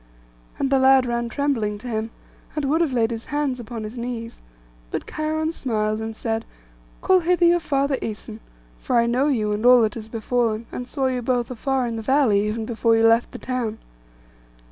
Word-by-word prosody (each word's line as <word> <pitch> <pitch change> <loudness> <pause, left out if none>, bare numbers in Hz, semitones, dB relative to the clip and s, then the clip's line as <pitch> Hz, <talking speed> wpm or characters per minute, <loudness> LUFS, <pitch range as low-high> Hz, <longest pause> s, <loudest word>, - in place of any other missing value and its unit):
And 275 -1 -1
the 270 - +4
lad 265 0 +5
ran 235 -1 -2
trembling 235 -7 -1
to 220 - -10
him, 220 -1 -2 0.5
and 300 -2 -1
would 310 +5 +2
have 325 -5 +1
laid 235 -2 +1
his 225 0 -5
hands 290 -3 -1
upon 230 -1 -6
his 220 +3 -7
knees; 235 -1 -5 0.5
but - - -4
Cheiron 315 +1 -2
smiled, 215 -6 -1
and 220 0 -5
said, 225 0 -2 0.6
'Call 375 -1 +4
hither 355 0 +2
your 345 +1 +5
father 280 -3 0
Æson, 220 -1 -6 0.4
for 255 - -2
I 235 - +4
know 250 +4 +1
you, 220 -7 +1
and 210 +1 -2
all 245 -1 +7
that 215 -1 +1
has 220 -1 -8
befallen, 230 0 -1
and 250 - -5
saw 270 -1 -2
you 255 -1 0
both 245 0 -1
afar 260 +1 -1
in 230 -1 -3
the - - -4
valley, 235 -4 +3
even 220 +1 -2
before 230 0 +2
you 225 - +4
left 230 +1 +4
the - - -7
town. 240 -4 -3
240 Hz, 200 wpm, -23 LUFS, 225-270 Hz, 0.6 s, all